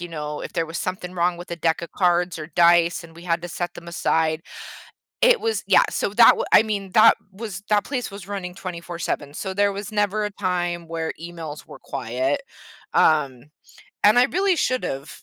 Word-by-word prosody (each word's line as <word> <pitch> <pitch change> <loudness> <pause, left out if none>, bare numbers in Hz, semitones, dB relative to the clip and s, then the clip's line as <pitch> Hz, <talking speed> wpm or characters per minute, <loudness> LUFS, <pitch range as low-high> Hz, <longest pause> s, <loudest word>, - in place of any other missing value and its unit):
you 175 - -6
know, 150 -2 -5
if - - -7
there 165 -1 -1
was 165 +1 -5
something 185 -1 -4
wrong 175 0 0
with 175 +1 -10
a 170 - -3
deck 165 0 0
of 170 - -8
cards 175 -2 +1
or 155 - -6
dice 170 +1 +3
and 165 0 -14
we 170 - -13
had 170 -1 0
to 175 - -5
set 175 +1 -4
them 170 - -11
aside, 160 -1 0 0.8
it - - +5
was 450 0 -1
yeah, - - +6
so - - -1
that 230 +3 +7
wa - - -2
I - - +8
mean, 200 -3 -3
that 215 - +7 0.2
was 200 -2 -7
that 210 -1 +3
place 255 -6 -3
was 200 -1 -10
running 185 -3 -5
24/7, 170 -5 -5
so 190 +2 -4
there 205 0 +2
was 200 +2 -6
never 210 0 0
a 210 - -2
time 175 -3 -2
where 165 0 -3
emails 165 -3 -7
were - - -12
quiet, 130 - -2 0.5
um, 140 -6 +2 0.6
and 215 +4 +6
I 245 - +7
really 370 +6 +1
should've 150 - -2
175 Hz, 200 wpm, -23 LUFS, 165-205 Hz, 0.8 s, I